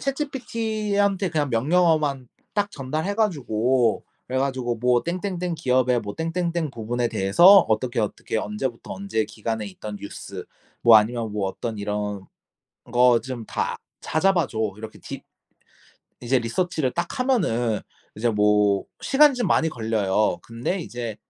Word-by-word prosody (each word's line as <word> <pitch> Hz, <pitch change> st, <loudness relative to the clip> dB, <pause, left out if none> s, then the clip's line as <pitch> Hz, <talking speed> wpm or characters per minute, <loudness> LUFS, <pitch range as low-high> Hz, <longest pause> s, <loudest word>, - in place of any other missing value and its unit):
ChatGPT한테 220 Hz, -8 st, -1 dB
그냥 150 Hz, -4 st, 0 dB
명령어만 145 Hz, 0 st, +2 dB, 0.3 s
딱 205 Hz, 0 st, 0 dB
전달해 155 Hz, +8 st, -3 dB
가지고 130 Hz, -, +1 dB, 0.2 s
그래 130 Hz, +1 st, -2 dB
가지고 130 Hz, -3 st, -1 dB
뭐 125 Hz, +1 st, +2 dB
"땡땡땡 180 Hz, 0 st, -3 dB
기업의 125 Hz, -5 st, +2 dB
뭐 100 Hz, -2 st, -6 dB
땡땡땡 165 Hz, -1 st, -2 dB
부분에 120 Hz, 0 st, -2 dB
대해서 95 Hz, -, +3 dB, 0.2 s
어떻게 120 Hz, +2 st, 0 dB
어떻게 110 Hz, +1 st, -3 dB
언제부터 115 Hz, +3 st, -4 dB
언제 190 Hz, -, -2 dB
기간에 110 Hz, -1 st, -4 dB
있던 105 Hz, +2 st, -7 dB
뉴스 100 Hz, -, -8 dB, 0.4 s
뭐 115 Hz, -2 st, +9 dB
아니면 110 Hz, 0 st, +1 dB
뭐 105 Hz, -2 st, -1 dB
어떤 110 Hz, +2 st, -5 dB
이런 105 Hz, -1 st, -3 dB, 0.7 s
거 125 Hz, -1 st, +5 dB
좀 125 Hz, -3 st, -6 dB
다 -, -, -2 dB, 0.2 s
찾아 190 Hz, +5 st, +2 dB
봐 175 Hz, -, +1 dB
줘." 110 Hz, -, -8 dB, 0.2 s
이렇게 110 Hz, 0 st, -9 dB
디 -, -, -8 dB, 1.0 s
이제 125 Hz, +2 st, +1 dB
research를 130 Hz, +3 st, -1 dB
딱 175 Hz, +9 st, -3 dB
하면은 120 Hz, -, +1 dB, 0.4 s
이제 115 Hz, +2 st, +1 dB
뭐 105 Hz, -1 st, +3 dB, 0.2 s
시간이 290 Hz, +1 st, +5 dB
좀 245 Hz, -3 st, -1 dB
많이 160 Hz, -2 st, +3 dB
걸려요. 110 Hz, -, 0 dB
근데 115 Hz, +11 st, -3 dB
이제 120 Hz, -7 st, -5 dB
125 Hz, 320 characters per minute, -24 LUFS, 110-175 Hz, 1.0 s, 뭐